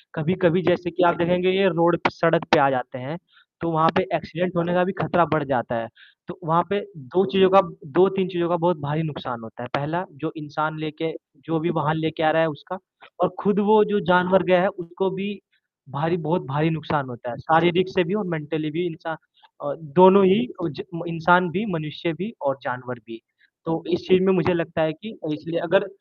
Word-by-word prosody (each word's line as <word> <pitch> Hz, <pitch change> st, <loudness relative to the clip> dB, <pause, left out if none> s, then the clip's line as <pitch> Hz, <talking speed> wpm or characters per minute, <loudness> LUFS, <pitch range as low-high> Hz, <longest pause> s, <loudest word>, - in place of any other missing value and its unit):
कभी-कभी 180 Hz, +2 st, +1 dB
जैसे 175 Hz, 0 st, 0 dB
कि 170 Hz, -, 0 dB
आप 170 Hz, -, +3 dB
देखेंगे 180 Hz, +2 st, +1 dB
ये 195 Hz, +1 st, +3 dB
रोड 170 Hz, 0 st, +2 dB
पे, -, -, +4 dB
सड़क 165 Hz, 0 st, +2 dB
पे -, -, +7 dB
आ 140 Hz, -, +5 dB
जाते 130 Hz, 0 st, -3 dB
हैं, 140 Hz, +6 st, -7 dB, 0.4 s
तो 165 Hz, -, -2 dB
वहाँ 160 Hz, 0 st, +4 dB
पे 190 Hz, -, +4 dB
एक्सीडेंट 180 Hz, +2 st, -4 dB
होने 170 Hz, +1 st, 0 dB
का 180 Hz, 0 st, +3 dB
भी 190 Hz, -, -1 dB
खतरा 170 Hz, +2 st, +3 dB
बढ़ 155 Hz, -1 st, +1 dB
जाता 120 Hz, -2 st, -1 dB
है। 115 Hz, 0 st, -3 dB, 0.4 s
तो 175 Hz, -, -10 dB
वहाँ 165 Hz, +2 st, +3 dB
पे 200 Hz, 0 st, 0 dB, 0.2 s
2 150 Hz, +7 st, 0 dB
चीज़ों 190 Hz, -1 st, +5 dB
का 195 Hz, +1 st, +7 dB, 0.4 s
2-3 190 Hz, +1 st, +3 dB
चीज़ों 170 Hz, -2 st, -2 dB
का 175 Hz, -, +2 dB
बहुत 175 Hz, +1 st, +1 dB
भारी 145 Hz, +2 st, -2 dB
नुकसान 130 Hz, -6 st, -6 dB
होता 115 Hz, +2 st, -11 dB
है। -, -, -7 dB
पहला 155 Hz, +6 st, -2 dB, 0.2 s
जो 160 Hz, 0 st, -3 dB
इंसान 155 Hz, +1 st, -4 dB
लेके 155 Hz, +1 st, -4 dB, 0.3 s
जो 160 Hz, +1 st, -1 dB
भी 170 Hz, +2 st, -2 dB
वाहन 155 Hz, 0 st, 0 dB
लेके 160 Hz, 0 st, -2 dB
आ 155 Hz, -, +4 dB
रहा 160 Hz, +1 st, +3 dB
है 160 Hz, -, +3 dB
उसका 150 Hz, +5 st, -9 dB, 0.5 s
और 180 Hz, -, +3 dB
खुद 205 Hz, +1 st, +1 dB
वो 215 Hz, 0 st, +7 dB
जो 205 Hz, 0 st, 0 dB
जानवर 180 Hz, +1 st, +4 dB
गया 180 Hz, 0 st, +4 dB
है 195 Hz, -, +3 dB
उसको 180 Hz, 0 st, -3 dB
भी 195 Hz, +2 st, -4 dB, 0.6 s
भारी 160 Hz, +6 st, -1 dB
बहुत 180 Hz, +3 st, +1 dB
भारी 150 Hz, +4 st, 0 dB
नुकसान 155 Hz, -3 st, -2 dB
होता 120 Hz, 0 st, -9 dB
है। -, -, -8 dB
शारीरिक 175 Hz, +3 st, +3 dB
से 190 Hz, -1 st, +1 dB
भी 175 Hz, +3 st, -4 dB
और 210 Hz, -1 st, -2 dB
मेंटली 155 Hz, -1 st, -4 dB
भी 175 Hz, +3 st, -2 dB
नुकसान 165 Hz, -1 st, -7 dB, 0.5 s
अ, 145 Hz, -, -3 dB, 0.2 s
दोनों 190 Hz, +2 st, +8 dB
ही 190 Hz, +3 st, +5 dB, 0.2 s
ओ -, -, 0 dB
ज 140 Hz, -, -8 dB
म 165 Hz, -, -6 dB
इंसान 175 Hz, +2 st, +3 dB
भी, 190 Hz, +6 st, -2 dB
मनुष्य 160 Hz, +1 st, -4 dB
भी 190 Hz, +8 st, -7 dB
और 135 Hz, -1 st, -1 dB
जानवर 125 Hz, 0 st, -6 dB
भी। 115 Hz, 0 st, -12 dB, 0.4 s
तो 165 Hz, 0 st, -3 dB
इस 180 Hz, -, -2 dB
चीज़ 185 Hz, 0 st, +5 dB
में 190 Hz, 0 st, +4 dB
मुझे 180 Hz, 0 st, +2 dB
लगता 170 Hz, -1 st, -2 dB
है 155 Hz, 0 st, +1 dB
कि 220 Hz, +8 st, -12 dB, 0.2 s
इसलिए 165 Hz, +2 st, -4 dB
अगर 195 Hz, +4 st, +2 dB
170 Hz, 220 wpm, -23 LUFS, 155-180 Hz, 0.6 s, दोनों